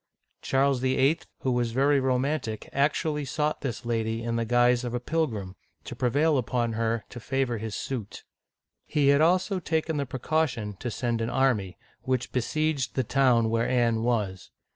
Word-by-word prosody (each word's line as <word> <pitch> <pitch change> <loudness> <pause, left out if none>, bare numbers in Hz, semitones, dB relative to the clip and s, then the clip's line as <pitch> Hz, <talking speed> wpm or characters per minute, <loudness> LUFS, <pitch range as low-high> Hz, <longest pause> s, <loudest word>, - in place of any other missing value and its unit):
Charles 135 0 +2
VIII., 130 +5 +2 0.2
who 130 - 0
was 120 -2 0
very 140 +3 +3
romantic, 130 -3 -1
actually 150 +2 +1
sought 150 +3 -1
this 125 -4 -4
lady 115 -1 -1
in 115 0 -2
the 115 0 0
guise 120 +1 +3
of 120 -1 -3
a - - 0
pilgrim, 120 - -2 0.3
to 105 - -7
prevail 140 +5 +2
upon 120 -2 -1
her 115 0 -1
to 120 - -8
favor 130 -1 -1
his 110 -1 -5
suit. 120 -7 -5 0.6
He 145 -2 +2
had 140 +1 +5
also 185 +4 +2
taken 160 -2 -1
the 140 -1 -2
precaution 130 -5 -1
to 120 - -4
send 120 0 -2
an 115 - -1
army, 120 -9 +1 0.2
which 130 0 -1
besieged 145 +2 -1
the 130 - +1
town 120 -3 +3
where 115 0 +1
Anne 120 -3 +2
was. 105 -6 -1
125 Hz, 165 wpm, -27 LUFS, 115-140 Hz, 0.6 s, had